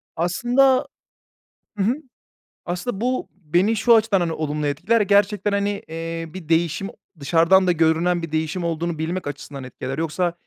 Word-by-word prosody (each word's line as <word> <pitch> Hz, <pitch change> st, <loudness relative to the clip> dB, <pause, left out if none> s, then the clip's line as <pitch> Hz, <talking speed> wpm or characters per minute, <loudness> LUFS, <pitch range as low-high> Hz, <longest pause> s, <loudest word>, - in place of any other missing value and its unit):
Aslında 245 Hz, +10 st, +2 dB, 0.9 s
Hı 200 Hz, -, 0 dB
hı. 230 Hz, +5 st, +2 dB, 0.7 s
Aslında 185 Hz, +5 st, -4 dB
bu, 255 Hz, +2 st, -1 dB
beni 185 Hz, +5 st, +1 dB
şu 230 Hz, +2 st, +5 dB
açıdan, 215 Hz, -3 st, +3 dB
hani, 170 Hz, -2 st, -1 dB
olumlu 150 Hz, -1 st, -2 dB
etkiler 155 Hz, +11 st, +1 dB
ya -, -, +3 dB
gerçekten, 205 Hz, +1 st, +2 dB
hani, 200 Hz, 0 st, -1 dB
eee, 165 Hz, +1 st, -5 dB
bir 180 Hz, -4 st, -9 dB
değişim 170 Hz, +4 st, +1 dB
o -, -, -13 dB, 0.3 s
dışarıdan 165 Hz, +6 st, +4 dB
da -, -, +5 dB
görünen 170 Hz, +1 st, +2 dB
bir 165 Hz, -2 st, -6 dB
değişim 160 Hz, +3 st, -2 dB
olduğunu 170 Hz, 0 st, -2 dB
bilmek 165 Hz, +2 st, -3 dB
açısından 140 Hz, -1 st, -7 dB
etkiler. 130 Hz, +1 st, -6 dB
Yoksa, 165 Hz, +2 st, -1 dB
175 Hz, 160 wpm, -22 LUFS, 160-200 Hz, 0.9 s, şu